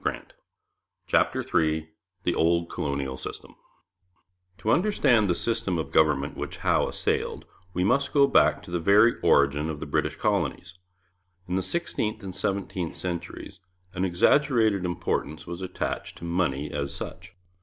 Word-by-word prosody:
CHAPTER - - +1
III 80 0 +1 0.4
THE 90 - +1
OLD 85 +1 +1
COLONIAL 70 -2 -3
SYSTEM - - -8 1.0
To 110 - 0
understand 120 - +3
the 85 - +2
system 115 -6 -1
of 75 -4 -4
government 75 -2 +2
which - - -5
Howe - - +3
assailed, - - -2 0.3
we 90 - +1
must 140 +7 +2
go 140 -1 +5
back - - +3
to - - -11
the 85 - 0
very 105 +7 +5
origin 70 +2 +3
of 75 -2 -4
the - - -5
British - - -1
colonies. 85 - -1 0.7
In 90 - -4
the 95 - +1
sixteenth 110 - -1
and 95 -2 -6
seventeenth 95 -3 -2
centuries 85 -2 -6 0.3
an 90 - -2
exaggerated 110 +1 +3
importance 80 -3 -2
was 85 +1 -7
attached 95 - -4
to - - -13
money 80 -5 -1
as 70 -1 -3
such. 90 +2 -8
90 Hz, 145 wpm, -26 LUFS, 80-105 Hz, 1.0 s, go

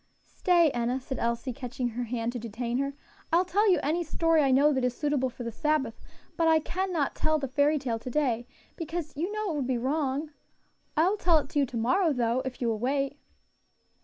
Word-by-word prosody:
"Stay, 345 -4 +3
Enna," 240 +1 -1
said 265 +1 -6
Elsie, 235 +2 -1
catching 250 0 -3
her 240 +1 -4
hand 230 0 -2
to 245 - -4
detain 235 +2 -3
her; 275 0 -2 0.4
"I 330 - +5
will 365 - +3
tell 410 +4 +2
you 360 -4 +4
any 325 +5 +1
story 330 0 +2
I 275 - +3
know 280 +3 +5
that 260 -2 0
is 250 -1 0
suitable 290 -4 0
for 245 0 -8
the 235 - -4
Sabbath; 270 -2 -1 0.3
but 330 - +2
I 320 0 +6
cannot 345 -2 -1
tell 310 0 +1
the 275 -2 -3
fairy 285 +3 +2
tale 245 -5 -2
to 250 - -7
day, 245 -4 0 0.3
because 325 -2 -5
you 340 +7 -2
know 425 -3 -2
it - - -3
would 270 -4 -1
be 255 -2 +1
wrong. 280 +3 -1 0.7
I 320 +3 +5
will 410 +3 +1
tell 340 -4 +4
it 290 - -2
to 290 - 0
you 275 - +2
to 240 - -5
morrow, 315 - +2
though, 240 0 +1
if 260 -1 -6
you - - +1
will 225 -2 0
wait." 275 +3 -1
275 Hz, 225 wpm, -28 LUFS, 245-315 Hz, 0.7 s, I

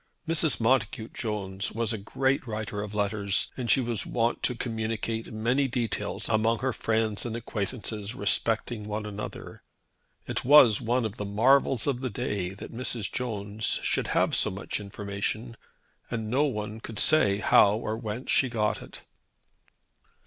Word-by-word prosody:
Mrs. 160 -1 +4
Montacute 115 -1 +1
Jones 100 -3 -3
was 115 0 0
a 110 - -3
great 130 +6 0
writer 105 -2 -4
of 105 0 -6
letters, 100 -1 +1
and 125 -3 -4
she - - +5
was 115 -4 -1
wont 120 0 0
to 125 - 0
communicate 115 -1 -3
many 120 +6 +1
details 120 -5 -2
among 115 +1 +2
her 130 +2 -1
friends 110 -2 0
and 115 -2 -4
acquaintances 110 -1 -4
respecting 110 +1 0
one 105 0 -3
another. 105 0 -7 0.6
It - - -2
was 125 -6 +7
one 120 +1 +1
of 110 +1 -4
the 105 - -4
marvels 120 +4 +3
of 130 -3 -1
the 130 - -2
day 95 -3 -2
that 100 +4 -9
Mrs. 115 -3 -2
Jones 105 -3 -2
should - - 0
have - - +2
so - - +3
much 95 +1 -4
information; 105 +3 -4 0.6
and 110 -2 -3
no 140 +4 +3
one 105 -5 -3
could 110 -1 -8
say 105 -10 +4
how 105 0 +5
or 110 -1 -3
whence 115 +2 -4
she 130 - +3
got 110 -3 0
it. - - -11
110 Hz, 155 wpm, -27 LUFS, 105-120 Hz, 0.6 s, was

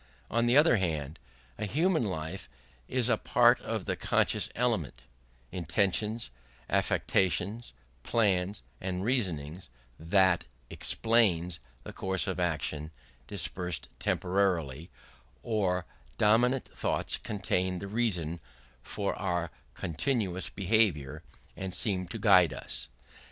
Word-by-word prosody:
On 115 +1 +2
the 120 +3 +5
other 150 -5 +6
hand, 80 -5 -2 0.4
in 105 - -2
human 165 - +2
life 80 -3 -5 0.4
it - - -4
is 125 -2 +3
a 115 -3 +3
part - - +4
of - - -3
the - - -1
conscious - - +1
element 90 - -1 0.5
intentions, 100 - -1 0.4
affections, 95 +6 0 0.3
plans, 95 - +1 0.2
and 90 0 -3
reasonings 90 - -1 0.3
that 95 +2 +3 0.3
explains 95 -7 +2 0.2
the - - -8
course 95 0 0
of 95 -2 -2
action: 80 -3 -2 0.4
dispersed 90 -3 -3
temporally, 90 -5 0 0.6
our 95 -6 +1 0.3
dominant 120 +5 +3
thoughts - - -1
contain 95 -3 -1
the 100 - -6
reason 95 -7 -1 0.4
for 100 +10 -3
our 90 -3 -1 0.2
continuous 95 - -1
behaviour, 90 -8 +1 0.3
and 95 -1 -4
seem 95 -4 +1
to 95 - -6
guide 95 -6 +5
it. - - -3
95 Hz, 110 wpm, -30 LUFS, 85-110 Hz, 0.6 s, other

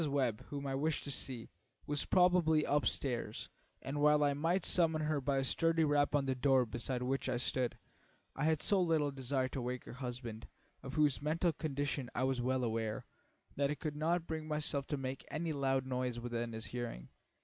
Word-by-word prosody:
Webb, 130 -4 0
whom 140 -1 -4
I 135 - -2
wished 150 +3 0
to 140 - -4
see, 130 -3 -3 0.3
was 145 -1 -1
probably 180 -4 +4
up 145 0 +2
stairs, 120 -5 -2 0.3
and 140 +2 -3
while 150 0 +5
I 145 -1 +3
might 165 +6 +1
summon 160 -3 +3
her 150 -2 0
by 135 +1 +1
a 135 - +2
sturdy 165 +4 +2
rap 145 -1 +3
on 140 -2 +2
the 135 - +1
door 130 0 +3
beside 120 +2 -3
which 135 +1 -1
I 125 - +1
stood, 125 0 -1 0.6
I 145 - -1
had 160 -1 +2
so 200 -2 +3
little 160 -4 +2
desire 130 -1 -1
to 130 - -4
wake 125 +1 -3
her - - -8
husband, 125 -3 -6 0.3
of 135 +1 -7
whose 150 -3 +3
mental 160 +3 +1
condition 140 -3 -2
I 130 - +1
was 130 -1 +1
well 130 +1 +1
aware, 110 -2 -2 0.5
that 140 0 +1
I 150 - 0
could 150 0 -4
not 165 +3 +1
bring 160 -1 -4
myself 150 -2 0
to 145 - -1
make 130 0 -4
any 160 +2 -2
loud 135 -2 +1
noise 125 -2 -2
within 120 -1 -3
his 110 0 -4
hearing. 120 - -5
140 Hz, 200 wpm, -35 LUFS, 125-150 Hz, 0.6 s, while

